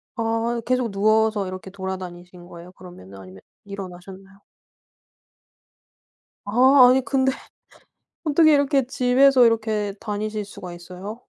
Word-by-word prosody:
아 230 +1 -2
계속 250 -2 -1
누워서 215 0 +1
이렇게 185 +1 -8
돌아다니신 180 -2 -8
거예요? 175 +1 -13
그러면은 175 - -14
아니면 95 0 -13 0.2
일어나셨나요? 195 0 -11 2.0
아 250 +5 +5
아니 260 +1 +3
근데 265 -1 +1 0.9
어떻게 315 0 +4
이렇게 280 -2 +2
집에서 255 +1 +3
이렇게 215 -3 0
다니실 210 0 -4
수가 185 -3 -10
있어요? 185 +6 -10
210 Hz, 290 characters per minute, -22 LUFS, 185-245 Hz, 2.0 s, 아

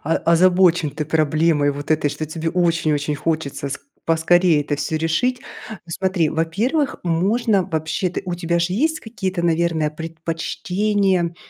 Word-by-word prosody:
о 160 +3 +1
озабочен 175 -1 +3
ты 150 +2 -4
проблемой 155 -1 +2
вот 145 +2 -8
этой, 155 -2 +2
что 155 - -4
тебе 160 +1 -3
очень 170 -3 +1
очень 145 0 -1
хочется 155 -2 -2
с 140 - -4 0.3
поскорее 165 -1 +3
это 145 - -2
всё 150 +2 -2
решить. 165 +11 0 0.3
Ну 220 - -6
смотри, 185 -1 0
во-первых 215 - 0
можно 195 +4 +1
вообще-то 160 +3 -2
у 180 - -3
тебя 170 0 -1
же 170 +1 0
есть 315 +10 0
какие-то, 190 -6 -4
наверное 165 -2 +1
предпочтения, 170 +4 -1
165 Hz, 145 wpm, -21 LUFS, 155-185 Hz, 0.3 s, озабочен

